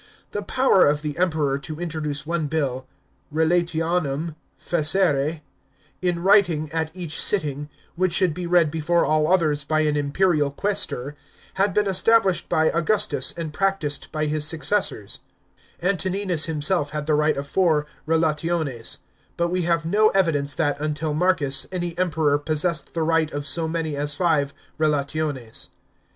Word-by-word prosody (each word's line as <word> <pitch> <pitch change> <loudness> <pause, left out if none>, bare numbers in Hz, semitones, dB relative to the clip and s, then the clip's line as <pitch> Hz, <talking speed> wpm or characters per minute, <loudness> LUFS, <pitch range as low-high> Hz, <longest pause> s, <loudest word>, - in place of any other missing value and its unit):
The 205 - -3
power 255 - +3
of 145 +1 0
the 150 -2 -3
Emperor 155 -6 0
to 155 +3 -8
introduce 155 -4 -3
one 165 -1 -1
bill 135 -4 -2 0.4
(relationem 165 -1 0 0.3
facere) 155 -2 +1 0.6
in 175 -2 -1
writing 180 -6 +3
at 160 -1 -2
each 170 -4 -3
sitting, 150 -6 0 0.3
which 185 0 +1
should 180 -2 +2
be 180 +2 -5
read 170 -3 +3
before 160 +2 +1
all 155 +1 +1
others 155 -5 +2
by 155 +2 0
an 150 -1 +1
impeiial 145 +1 +1
qusestor, 195 -10 -1 0.4
had 195 +1 0
been 210 0 +3
established 195 0 +2
by 160 0 +2
Augustus 170 -5 +1
and 160 -3 -5
practised 195 -6 -1
by 155 -1 -1
his 150 0 0
successors; 155 - -1 0.6
Antoninus 190 -2 0
himself 155 0 -1
had 150 -1 -4
the 155 - +1
r 150 - +3
ght - - 0
of 140 0 -4
four 155 -3 +2 0.2
relationes; 160 -5 -1 0.4
but 170 0 0
we 180 +1 -1
have 165 -1 +1
no 210 +5 +3
evidence 145 -7 +1
that, 145 -2 0
until 150 0 -2
Marcus, 150 -5 +2
any 175 -2 -3
Emperor 155 -5 +1
possessed 155 +1 -1
the 165 - 0
right 160 -1 +1
of 145 0 -4
so 165 +2 +1
many 160 -2 -3
as 145 +1 +1
five 150 -4 +1 0.3
relations. 145 -4 -1
160 Hz, 150 wpm, -23 LUFS, 150-175 Hz, 0.6 s, power